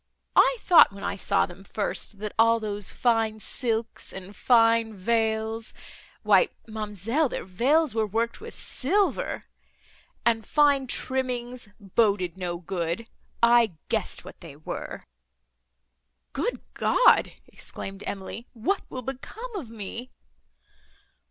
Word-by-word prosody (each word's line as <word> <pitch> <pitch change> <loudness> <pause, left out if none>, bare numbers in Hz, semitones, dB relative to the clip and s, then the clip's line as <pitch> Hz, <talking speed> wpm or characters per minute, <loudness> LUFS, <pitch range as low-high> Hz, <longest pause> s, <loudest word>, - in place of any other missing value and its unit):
I - - +5
thought, 350 - +7
when 195 0 -10
I - - -1
saw 200 0 +1
them 190 +1 -12
first, 205 +1 -3
that 210 +1 -5
all 230 0 +5
those 205 -2 -3
fine 225 -3 +1
silks 225 0 -2
and 190 +2 -9
fine 230 -2 +4
veils,—why, 220 - 0 0.2
ma'amselle, 220 - -1
their - - -4
veils 260 - +2
were 220 -1 +1
worked 230 - -1
with 460 +1 -8
silver! 390 +9 0 0.8
and 225 -1 +3
fine 285 0 +3
trimmings—boded 230 -8 -1
no 180 -2 -3
good—I 210 +5 +1 0.2
guessed - - -1
what - - -12
they 140 - -10
were!" 155 - -6 1.3
"Good 340 - -2
God!" - - +4
exclaimed 195 +1 -8
Emily, 200 +4 -6
"what 260 - 0
will 255 - -6
become 425 - -7
of 310 - -5
me!" 230 +3 -7
225 Hz, 115 wpm, -26 LUFS, 205-250 Hz, 1.3 s, thought